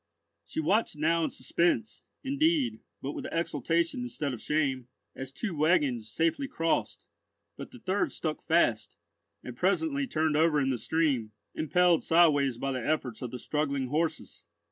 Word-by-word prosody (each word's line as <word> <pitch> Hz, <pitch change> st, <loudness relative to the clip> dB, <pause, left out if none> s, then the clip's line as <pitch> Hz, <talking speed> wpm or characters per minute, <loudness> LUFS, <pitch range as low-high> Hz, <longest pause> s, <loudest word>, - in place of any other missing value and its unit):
She -, -, -4 dB
watched 190 Hz, +5 st, +1 dB
now 165 Hz, +2 st, +2 dB
in -, -, 0 dB
suspense, 170 Hz, -, 0 dB, 0.2 s
indeed, 275 Hz, -4 st, +1 dB, 0.2 s
but 135 Hz, -, -2 dB
with -, -, -6 dB
exultation 170 Hz, +4 st, 0 dB
instead 155 Hz, -, -3 dB
of 120 Hz, -, -7 dB
shame, 135 Hz, -5 st, 0 dB, 0.3 s
as 135 Hz, 0 st, -7 dB
two 195 Hz, -, -4 dB
waggons 145 Hz, -8 st, +2 dB
safely 165 Hz, -, 0 dB
crossed; 165 Hz, -11 st, -1 dB, 0.5 s
but -, -, -8 dB
the 255 Hz, -, -13 dB
third 200 Hz, -3 st, -1 dB
stuck 155 Hz, -2 st, -3 dB
fast, 120 Hz, -11 st, +1 dB, 0.5 s
and 125 Hz, -, -7 dB
presently 275 Hz, -, +1 dB
turned 155 Hz, -7 st, 0 dB
over 155 Hz, -1 st, +3 dB
in 135 Hz, -1 st, +1 dB
the 125 Hz, -, -2 dB
stream, 135 Hz, -10 st, 0 dB, 0.2 s
impelled 175 Hz, +1 st, +3 dB
sideways 145 Hz, -7 st, +4 dB
by 135 Hz, +3 st, -2 dB
the 130 Hz, -2 st, -3 dB
efforts 130 Hz, -7 st, -1 dB
of 125 Hz, -, -4 dB
the 125 Hz, -, -6 dB
struggling 140 Hz, -1 st, -2 dB
horses. 160 Hz, +2 st, -2 dB
155 Hz, 155 wpm, -29 LUFS, 135-175 Hz, 0.5 s, sideways